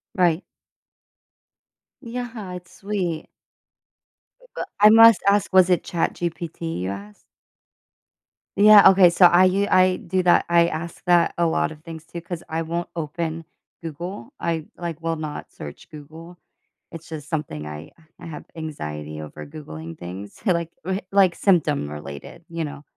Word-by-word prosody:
Right. 175 -1 +2 1.6
Yeah, 230 -5 -6
it's 180 -1 -10
sweet. 185 -6 -3 1.1
B - - -20
but - - -5
I 210 +1 +8
must 225 -1 +8
ask, 200 -1 +2
was 185 -1 +6
it 180 - +2
Chat 170 - -1
GPT 165 - -4
you 95 +1 -3
asked? 100 +1 -9 1.3
Yeah, 205 -1 +9
okay, 190 -2 +6
so 175 +1 +5
I 175 +2 +5
u 195 +2 +2
I 185 0 +5
do 185 +1 -2
that, 175 -1 +4
I 170 0 +5
ask 170 +1 -6
that 175 -1 +3
a 170 - +2
lot 160 - 0
of 155 0 -13
things 165 -1 -9
too 170 - -8
'cause 170 0 -7
I 165 +1 -2
won't 170 +2 -4
open 165 +1 -4 0.4
Google. 175 - -7
I, 165 -2 -2
like, 170 -2 -5
will 165 0 -1
not 155 -2 -6
search 75 - -10
Google. 160 +3 -12 0.5
It's 165 0 -10
just 155 -3 -8
something 145 - -4
I 75 +1 -8 0.3
I - - -11
have 155 -3 -8
anxiety 75 - -6
over 75 - -9
Googling 85 - -9
things, 95 +3 -9
like, 170 -4 0
r 190 +1 -1
like 190 -3 +4
symptom 155 - +1
related, 75 - -9
you 165 -1 -3
know. 145 0 -9
165 Hz, 155 wpm, -23 LUFS, 150-185 Hz, 1.6 s, Yeah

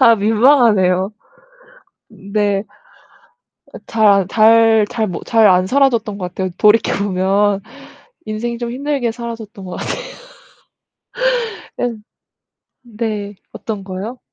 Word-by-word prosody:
아 230 -3 +7
민망하네요. 210 -4 +3 1.0
네. 200 0 -2 1.1
아 - - -7
잘 220 -1 -1
안 195 -2 +2
잘 225 0 +4
잘 225 -3 -1
못 180 -3 -6
잘 225 -2 +4
안 185 -1 +4
살아졌던 235 -6 +1
것 180 -2 -4
같아요. 185 0 -3
돌이켜 210 +2 +4
보면 195 +1 +1 0.7
인생이 230 +2 -4
좀 235 -1 -4
힘들게 275 -1 -2
살아졌던 230 -4 -8
것 180 - -8
같아요. - - -4 1.7
네. 240 -2 -2 1.3
네. 205 - -12 0.2
어떤 210 -3 -6
거요? 195 +6 -7
215 Hz, 205 characters per minute, -17 LUFS, 195-235 Hz, 1.7 s, 아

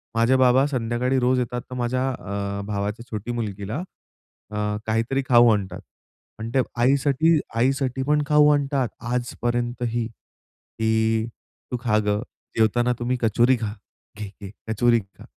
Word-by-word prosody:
माझे 115 +3 +4
बाबा 130 +1 +5
संध्याकाळी 125 0 0
रोज 125 +1 +2
येतात, 120 0 -2
तर 125 - -6
माझ्या 125 +2 0
अ, 100 -4 -4
भावाच्या 105 +3 -3
छोटी 110 +2 -4
मुलगीला, 105 -1 -4 0.7
अ, 105 0 -1
काहीतरी 115 +5 0
खाऊ 120 -1 +7
आणतात 95 -3 -3 0.6
आणि 115 +1 -4
ते - - +5 0.2
आईसाठी 140 +4 +3 0.2
आईसाठी 130 +1 +1
पण 150 0 +3
खाऊ 150 0 +5
आणतात 140 -3 0 0.2
आजपर्यंतही 120 -1 -1 0.7
की, 110 0 +2 0.5
"तू 125 - -1
खा 110 -3 +2
गं. 105 +1 +1 0.4
जेवताना 120 +3 +3
तुम्ही 125 +1 -1
कचोरी 120 +3 +3
खा. 105 -1 -2 0.4
घे, 105 -1 -5
घे 100 - -7 0.2
कचोरी 115 +2 +3
खा" 100 -1 -15
120 Hz, 135 wpm, -24 LUFS, 110-130 Hz, 0.7 s, खाऊ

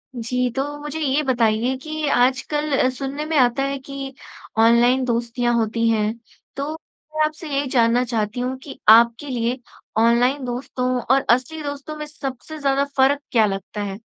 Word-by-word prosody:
जी, 250 +2 -1
तो 270 - +1 0.2
मुझे 295 +2 -5
ये 290 -1 +1
बताइए 240 -1 +1
कि 310 +2 -4
आजकल 270 +2 +1
सुनने 275 +3 -5
में 315 0 0
आता 255 0 +3
है 275 0 -2
कि, 275 0 -7 0.4
ऑनलाइन 235 +3 +4
दोस्तियाँ 240 0 0
होती 230 0 +1
हैं। 215 -1 +1 0.4
तो, 280 +2 -3
मैं 310 -1 -5
आपसे 310 +1 -6
ये 280 +1 +1
जानना 240 -1 +3
चाहती 225 -1 -2
हूँ 250 +1 -2
कि 275 - -10
आपके 235 +5 +6
लिए 245 0 -1 0.4
ऑनलाइन 240 +5 +3
दोस्तों 250 +1 -3
और 265 +3 +2
असली 255 +6 +1
दोस्तों 285 +1 -6
में 300 - -5
सबसे 295 0 -7
ज़्यादा 275 -1 +1
फ़र्क 275 +2 +3
क्या 225 -3 +4
लगता 200 +1 -4
है? 195 0 -5
255 Hz, 160 wpm, -21 LUFS, 235-280 Hz, 0.4 s, आपके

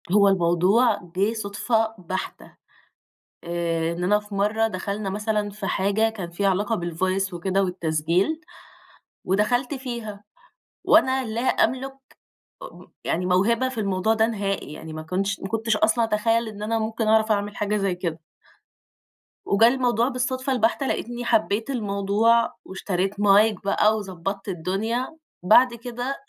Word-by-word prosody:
هو 200 +1 +5
الموضوع 185 +5 +3 0.2
جِه 200 +4 +1
صدفة 220 +1 -1
بحتة، 185 0 -6 0.9
آآ 170 -1 -1
إننا 180 +5 +1
في 210 -1 -10
مرة 215 +3 +1
دخلنا 200 0 -4
مثلًا 210 +1 -1
في 205 -1 -6
حاجة 205 +3 +1
كان 195 -6 -7
فيها 195 +3 0
علاقة 205 +4 0
بالvoice 185 +3 -1
وكده 190 +3 0
والتسجيل، 175 - 0 0.8
ودخلت 215 +8 +1
فيها، 235 -6 -6 0.6
وأنا 265 -4 +4
لا 220 +1 -3
أملُك 260 +1 0 0.8
م - - -14 0.2
يعني 180 +2 -1
موهبة 220 +8 +2
في 260 -2 -7
الموضوع 195 +1 +1
ده 220 0 +3
نهائي، 200 -7 -3
يعني 160 - -9
ما 155 0 -6
كُنتش 190 +5 -2
ما 195 - -5
كُنتش 225 +1 0
أصلًا 225 +2 +2
أتخيل 225 +1 +1
إن 210 -1 -9
أنا 225 +2 0
ممكن 220 0 -2
أعرف 220 0 +4
أعمل 205 0 -2
حاجة 210 0 -1
زي 195 -3 0
كده. 170 -2 -4 1.3
وجه 210 +3 +5
الموضوع 245 -2 +2
بالصدفة 255 +1 -2
البحتة 240 +3 +1
لاقيتني 240 0 -3
حبيت 220 +1 +1
الموضوع، 215 0 +1
واشتريت 190 0 -2
Mic 205 0 +4
بقى 210 +2 +2
وضبَّطت 195 0 -5
الدنيا، 195 +8 -2 0.4
بعد 240 +6 +6
كده 245 +3 -5
210 Hz, 135 wpm, -24 LUFS, 190-230 Hz, 1.3 s, بعد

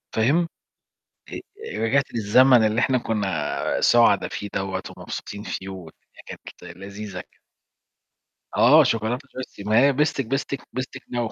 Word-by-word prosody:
فاهم؟ 145 +10 +2 0.8
أ - - -6 0.4
رجعت 135 +5 +2
للزمن 120 +2 +5
اللي 110 +2 +1
إحنا 130 -1 +2
كنا 95 -10 -2 0.2
سعدا 115 -4 +4
فيه 100 - -6
دَوّة 95 -1 -3
ومبسوطين 100 0 -7
فيه، 95 -2 -6
والدنيا 90 -4 -12
كانت 85 - -11
لذيذة 100 -1 -7
كده. - - -16 1.2
آه 150 +6 +7
شوكولاتة 120 +3 -1
جيرسي 130 -6 -8
ماهي 115 +7 +4
بستك 145 -2 0
بستك 135 +2 -2
بستك 130 0 -5
نووو 120 -2 -2
115 Hz, 125 wpm, -23 LUFS, 100-130 Hz, 1.2 s, آه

